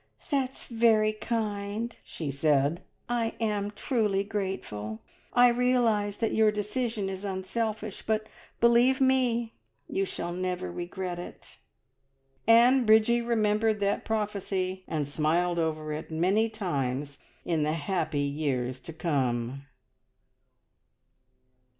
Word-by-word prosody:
"That's 270 Hz, -2 st, -1 dB
very 225 Hz, -2 st, +3 dB
kind!" 215 Hz, 0 st, -3 dB
she 150 Hz, -4 st, -5 dB
said. 145 Hz, +2 st, +2 dB, 0.3 s
"I 235 Hz, -2 st, -1 dB
am 210 Hz, -3 st, 0 dB
truly 210 Hz, -3 st, 0 dB
grateful. 190 Hz, -, -4 dB, 0.3 s
I 245 Hz, 0 st, +6 dB
realise 235 Hz, -4 st, +2 dB
that 225 Hz, -2 st, 0 dB
your 220 Hz, -1 st, +4 dB
decision 210 Hz, 0 st, -2 dB
is 190 Hz, 0 st, -5 dB
unselfish, 205 Hz, +2 st, -3 dB
but 215 Hz, 0 st, +1 dB, 0.3 s
believe 235 Hz, +3 st, +5 dB
me, 250 Hz, -3 st, +2 dB, 0.3 s
you 195 Hz, -, 0 dB
shall 175 Hz, -2 st, -4 dB
never 180 Hz, -, -3 dB
regret 175 Hz, -, -4 dB
it!" 175 Hz, -, -11 dB, 0.9 s
And 240 Hz, +3 st, +6 dB
Bridgie 220 Hz, +2 st, +5 dB
remembered 220 Hz, -2 st, +1 dB
that 200 Hz, 0 st, +1 dB
prophecy, 195 Hz, -3 st, -2 dB
and 150 Hz, -3 st, -2 dB
smiled 170 Hz, +4 st, +1 dB
over 155 Hz, -2 st, -1 dB
it 155 Hz, +1 st, -6 dB
many 190 Hz, +8 st, +2 dB
times 145 Hz, -, -3 dB, 0.3 s
in 165 Hz, -3 st, 0 dB
the 150 Hz, +1 st, +1 dB
happy 160 Hz, -2 st, -1 dB
years 140 Hz, -3 st, -1 dB
to 165 Hz, -, -9 dB
come. 135 Hz, -4 st, -1 dB
200 Hz, 115 wpm, -28 LUFS, 160-225 Hz, 0.9 s, I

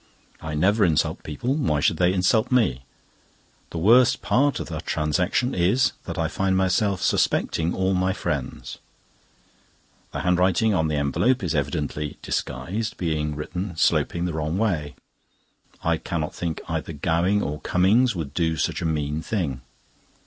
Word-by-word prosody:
I 80 Hz, -1 st, -4 dB
never 100 Hz, +7 st, +3 dB
insult 80 Hz, -5 st, +1 dB
people; 100 Hz, -, -2 dB
why 80 Hz, -, 0 dB
should 80 Hz, +3 st, +2 dB
they 90 Hz, +1 st, +3 dB
insult 95 Hz, +5 st, +2 dB
me? 110 Hz, -, +2 dB, 0.9 s
The -, -, -6 dB
worst 115 Hz, +8 st, +4 dB
part 140 Hz, +2 st, +2 dB
of -, -, -4 dB
the 80 Hz, -1 st, -5 dB
transaction 85 Hz, -, 0 dB
is, 100 Hz, +9 st, +2 dB
that -, -, -5 dB
I 80 Hz, -1 st, +1 dB
find 95 Hz, +3 st, 0 dB
myself 95 Hz, +1 st, +1 dB
suspecting 80 Hz, +1 st, +1 dB
all 95 Hz, 0 st, +1 dB
my 95 Hz, 0 st, +1 dB
friends. 65 Hz, -8 st, -4 dB, 1.3 s
The -, -, -4 dB
handwriting 90 Hz, +4 st, +2 dB
on 80 Hz, -4 st, +1 dB
the 75 Hz, -, -1 dB
envelope 100 Hz, -, +1 dB
is 85 Hz, -, -1 dB
evidently 75 Hz, 0 st, -2 dB
disguised, 95 Hz, -, -3 dB
being 75 Hz, -3 st, -1 dB
written 90 Hz, +4 st, -5 dB
sloping 85 Hz, +1 st, +1 dB
the 90 Hz, -, -2 dB
wrong 80 Hz, +2 st, -2 dB
way. 85 Hz, -9 st, -1 dB, 0.9 s
I 85 Hz, -1 st, +2 dB
cannot 80 Hz, -1 st, -3 dB
think 85 Hz, -2 st, -4 dB
either 80 Hz, 0 st, -3 dB
Gowing 85 Hz, +7 st, +1 dB
or 75 Hz, +1 st, -4 dB
Cummings 105 Hz, +6 st, +3 dB
would 75 Hz, -5 st, -5 dB
do 80 Hz, -1 st, 0 dB
such -, -, -1 dB
a -, -, -2 dB
mean 75 Hz, -1 st, -1 dB
thing. 80 Hz, -, -2 dB
85 Hz, 150 wpm, -24 LUFS, 75-95 Hz, 1.3 s, worst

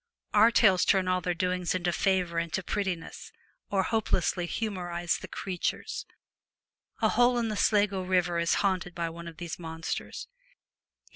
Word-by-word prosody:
Our 215 Hz, +2 st, +7 dB
tales 195 Hz, -6 st, +5 dB
turn 190 Hz, -2 st, +3 dB
all 185 Hz, 0 st, +1 dB
their 180 Hz, -1 st, -1 dB
doings 180 Hz, 0 st, 0 dB
to 175 Hz, 0 st, 0 dB
favour 180 Hz, -2 st, +1 dB
and 165 Hz, -1 st, -3 dB
to 190 Hz, -, -1 dB
prettiness, 185 Hz, -4 st, -3 dB, 0.4 s
or 195 Hz, -2 st, +2 dB
hopelessly 185 Hz, -5 st, 0 dB
humorize 175 Hz, -5 st, -2 dB
the -, -, -8 dB
creatures. 185 Hz, -3 st, -3 dB, 1.0 s
A -, -, +5 dB
hole 245 Hz, 0 st, +4 dB
in 230 Hz, -2 st, 0 dB
the 215 Hz, -, -2 dB
Sligo 205 Hz, -2 st, +2 dB
river 180 Hz, -2 st, +1 dB
is 170 Hz, 0 st, +2 dB
haunted 185 Hz, -2 st, -1 dB
by 170 Hz, -1 st, -2 dB
one 170 Hz, +1 st, -9 dB
of 165 Hz, -1 st, -9 dB
these 170 Hz, +1 st, -6 dB
monsters. 165 Hz, -, -5 dB
180 Hz, 155 wpm, -29 LUFS, 170-195 Hz, 1.0 s, Our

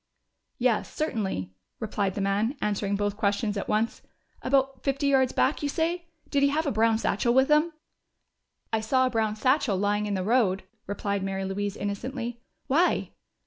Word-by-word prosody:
"Yes, 240 Hz, -3 st, +1 dB
certainly," 205 Hz, -, -2 dB, 0.3 s
replied 205 Hz, -4 st, -1 dB
the 200 Hz, -, -2 dB
man, 205 Hz, +7 st, 0 dB
answering 205 Hz, -1 st, 0 dB
both 205 Hz, 0 st, -1 dB
questions 205 Hz, 0 st, 0 dB
at 200 Hz, -, -3 dB
once. 220 Hz, +2 st, 0 dB, 0.4 s
"About 270 Hz, 0 st, +1 dB
fifty 275 Hz, +1 st, -1 dB
yards 265 Hz, -2 st, +4 dB
back, 270 Hz, -, +1 dB
you 290 Hz, -, -1 dB
say? 340 Hz, +3 st, -1 dB, 0.2 s
Did 280 Hz, -, +2 dB
he 280 Hz, -, +5 dB
have 310 Hz, +3 st, 0 dB
a 285 Hz, -, +1 dB
brown 225 Hz, 0 st, +3 dB
satchel 235 Hz, +2 st, +1 dB
with 265 Hz, +2 st, +4 dB
him?" 305 Hz, +3 st, +4 dB, 1.0 s
"I 220 Hz, -, +3 dB
saw 260 Hz, +4 st, +2 dB
a 255 Hz, -, 0 dB
brown 220 Hz, -2 st, 0 dB
satchel 255 Hz, -2 st, +2 dB
lying 205 Hz, +2 st, +1 dB
in 205 Hz, -, -1 dB
the 185 Hz, -, -1 dB
road," 210 Hz, -3 st, +2 dB, 0.2 s
replied 200 Hz, 0 st, -2 dB
Mary 195 Hz, 0 st, -2 dB
Louise 200 Hz, +1 st, -3 dB
innocently. 235 Hz, +4 st, -4 dB, 0.2 s
"Why?" 330 Hz, +7 st, +2 dB
225 Hz, 170 wpm, -27 LUFS, 205-270 Hz, 1.0 s, he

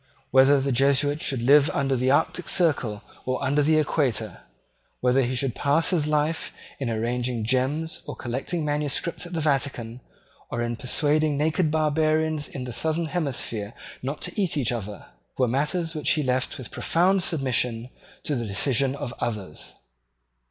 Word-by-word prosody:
Whether 135 Hz, +2 st, +6 dB
the 135 Hz, +1 st, -1 dB
Jesuit 140 Hz, +3 st, +3 dB
should 130 Hz, -5 st, -1 dB
live 145 Hz, +3 st, +6 dB
under 135 Hz, -1 st, +1 dB
the 130 Hz, +1 st, +1 dB
arctic 160 Hz, +5 st, +1 dB
circle 130 Hz, -, +1 dB, 0.2 s
or 130 Hz, 0 st, -1 dB
under 140 Hz, +2 st, +2 dB
the 155 Hz, +2 st, +3 dB
equator, 130 Hz, -8 st, 0 dB, 0.6 s
whether 125 Hz, +2 st, +3 dB
he 130 Hz, 0 st, -1 dB
should 130 Hz, -1 st, -1 dB
pass 145 Hz, +7 st, +1 dB
his 160 Hz, -5 st, +1 dB
life 150 Hz, +1 st, 0 dB, 0.3 s
in 135 Hz, -4 st, -2 dB
arranging 120 Hz, +1 st, -1 dB
gems 135 Hz, +7 st, 0 dB
and -, -, -6 dB
collating 135 Hz, +7 st, -3 dB
manuscripts 150 Hz, +4 st, -2 dB
at 175 Hz, -, -10 dB
the 165 Hz, -, -1 dB
Vatican 130 Hz, -5 st, -1 dB, 0.5 s
or 120 Hz, 0 st, -2 dB
in 120 Hz, 0 st, -2 dB
persuading 150 Hz, +4 st, +1 dB
naked 160 Hz, +2 st, +1 dB
barbarians 155 Hz, 0 st, +1 dB
in 130 Hz, -, -6 dB
the 125 Hz, -1 st, -6 dB
southern 160 Hz, +6 st, 0 dB
hemisphere 120 Hz, -, -2 dB, 0.3 s
not 140 Hz, +4 st, -4 dB
to 210 Hz, -, -2 dB
eat 175 Hz, -5 st, 0 dB
each 130 Hz, -5 st, +1 dB
other, 105 Hz, -4 st, -5 dB, 0.3 s
were 130 Hz, -, +3 dB
matters 150 Hz, +7 st, -1 dB
which 150 Hz, -3 st, -1 dB
he 155 Hz, -, 0 dB
left 130 Hz, 0 st, -1 dB
with 130 Hz, -, -9 dB
profound 185 Hz, +3 st, +2 dB
submission 125 Hz, -7 st, 0 dB, 0.3 s
to 150 Hz, -, -1 dB
the 120 Hz, -3 st, -3 dB
decision 130 Hz, +6 st, +1 dB
of 140 Hz, -3 st, -5 dB
others. 100 Hz, -9 st, -4 dB
140 Hz, 160 wpm, -25 LUFS, 125-155 Hz, 0.6 s, Whether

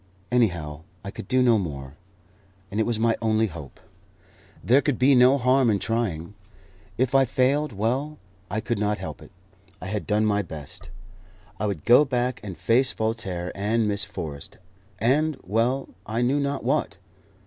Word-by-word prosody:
Anyhow, 85 Hz, -11 st, 0 dB, 0.2 s
I 100 Hz, -, -6 dB
could 95 Hz, -, -9 dB
do 130 Hz, 0 st, +3 dB
no 120 Hz, -3 st, +4 dB
more, 70 Hz, -6 st, -6 dB, 0.8 s
and 105 Hz, -, -2 dB
it 110 Hz, -, +1 dB
was 120 Hz, -2 st, 0 dB
my 115 Hz, +1 st, +2 dB
only 110 Hz, 0 st, +2 dB
hope. 80 Hz, -8 st, -9 dB, 0.8 s
There 130 Hz, +4 st, +5 dB
could 145 Hz, -4 st, 0 dB
be 135 Hz, +2 st, +5 dB
no 130 Hz, +2 st, +6 dB
harm 130 Hz, -1 st, +3 dB
in 105 Hz, -, +3 dB
trying. 105 Hz, -6 st, -2 dB, 0.6 s
If 130 Hz, +1 st, +1 dB
I 135 Hz, 0 st, +6 dB
failed, 135 Hz, +3 st, +1 dB
well, 130 Hz, +9 st, -2 dB, 0.3 s
I 110 Hz, +3 st, -2 dB
could 120 Hz, -2 st, -2 dB
not 105 Hz, 0 st, 0 dB
help 75 Hz, -7 st, -7 dB
it; -, -, -13 dB, 0.5 s
I -, -, -8 dB
had 105 Hz, +2 st, -4 dB
done 105 Hz, +1 st, +2 dB
my 105 Hz, -1 st, +2 dB
best. 75 Hz, -7 st, -8 dB, 0.7 s
I 105 Hz, -, 0 dB
would 95 Hz, -7 st, -4 dB
go 125 Hz, +5 st, +7 dB
back 125 Hz, -2 st, -1 dB
and 95 Hz, -4 st, -7 dB
face 115 Hz, +10 st, +3 dB
Voltaire 100 Hz, -6 st, -3 dB
and 110 Hz, +3 st, 0 dB
Miss 100 Hz, 0 st, +2 dB
Forrest, 75 Hz, -9 st, -7 dB, 0.4 s
and 145 Hz, +6 st, +1 dB
well 115 Hz, +7 st, 0 dB, 0.2 s
I 110 Hz, +3 st, -1 dB
knew 135 Hz, +4 st, +2 dB
not 140 Hz, -1 st, -2 dB
what 130 Hz, -6 st, 0 dB
110 Hz, 170 wpm, -25 LUFS, 100-130 Hz, 0.8 s, go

